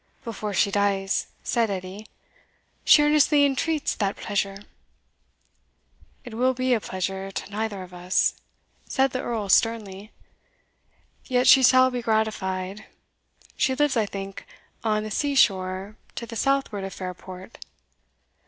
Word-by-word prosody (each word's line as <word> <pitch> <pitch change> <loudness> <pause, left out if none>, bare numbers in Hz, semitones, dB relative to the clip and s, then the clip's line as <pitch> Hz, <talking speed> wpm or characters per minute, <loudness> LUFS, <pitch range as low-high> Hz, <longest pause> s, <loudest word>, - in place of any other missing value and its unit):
"Before 215 -3 -5
she 200 +1 +2
dies," 195 -1 0 0.2
said 230 -2 +1
Edie, 190 +2 -6 0.8
"she 295 - +7
earnestly 295 -1 +4
entreats 295 +2 0
that 200 -2 -1
pleasure." 200 -1 -3 1.6
"It 240 - -9
will 255 +3 +1
be 255 0 +1
a 235 - +2
pleasure 190 +1 -4
to 195 - -6
neither 205 -2 -3
of 180 0 -13
us," 180 +1 +1 0.6
said 265 0 +2
the 255 - -2
Earl, 225 -4 -3
sternly, 210 -1 +1 1.1
"yet 250 -1 +1
she 265 - +8
shall 255 0 +6
be 250 -1 -3
gratified. 210 -3 -1 0.7
She 260 - +1
lives, 295 -1 +2
I 220 -3 +1
think, 195 -1 -7 0.4
on 215 -1 +1
the 215 - -6
sea 285 +5 0
shore 190 -2 +1 0.2
to 235 - -5
the 230 - -9
southward 270 -6 0
of 195 - -6
Fairport?" 185 +2 -8
215 Hz, 135 wpm, -25 LUFS, 195-255 Hz, 1.6 s, she